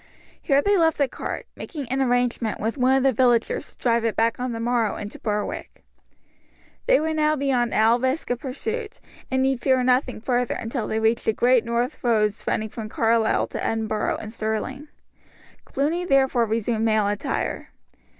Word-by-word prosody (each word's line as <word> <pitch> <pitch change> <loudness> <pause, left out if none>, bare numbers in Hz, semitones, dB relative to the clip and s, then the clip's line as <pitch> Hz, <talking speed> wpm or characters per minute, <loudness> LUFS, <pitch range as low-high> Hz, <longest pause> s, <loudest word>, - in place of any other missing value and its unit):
Here 280 -2 +2
they 405 0 +3
left 325 -2 +3
the 280 - +2
cart, - - -5
making 290 -6 -7
an 265 +1 0
arrangement 245 -3 0
with 225 +2 -2
one 260 0 +3
of 265 - +1
the 270 -1 +3
villagers 240 -1 +1
to - - -33
drive 235 -2 +1
it 230 -2 0
back 230 +1 +1
on 250 0 -2
the 230 - -4
morrow 235 -2 0
into 205 0 -7
Berwick. 210 -1 -4 1.0
They - - +5
were 315 +1 -1
now 305 0 +2
beyond 265 -4 0
all 225 +3 +4
risk 260 +2 -1
of 245 - -1
pursuit, 430 - -5 0.3
and 260 0 +1
need 265 -2 0
fear 260 -2 +2
nothing 250 0 +1
further 245 +1 0
until 230 -1 -3
they 220 - -1
reached 220 +1 +1
the 220 - +2
great 245 +1 +3
north 235 +5 -2
roads 215 -3 +1
running 220 0 -1
from 215 0 -7
Carlisle 225 0 +2
to - - -5
Edinburgh 220 -1 -1
and 215 0 -8
Stirling. 230 +6 -3 0.8
Cluny 310 +6 -1
therefore 265 -7 +2
resumed 225 0 -1
male 215 -2 +2
attire. 205 0 -2
245 Hz, 180 wpm, -24 LUFS, 225-270 Hz, 1.0 s, They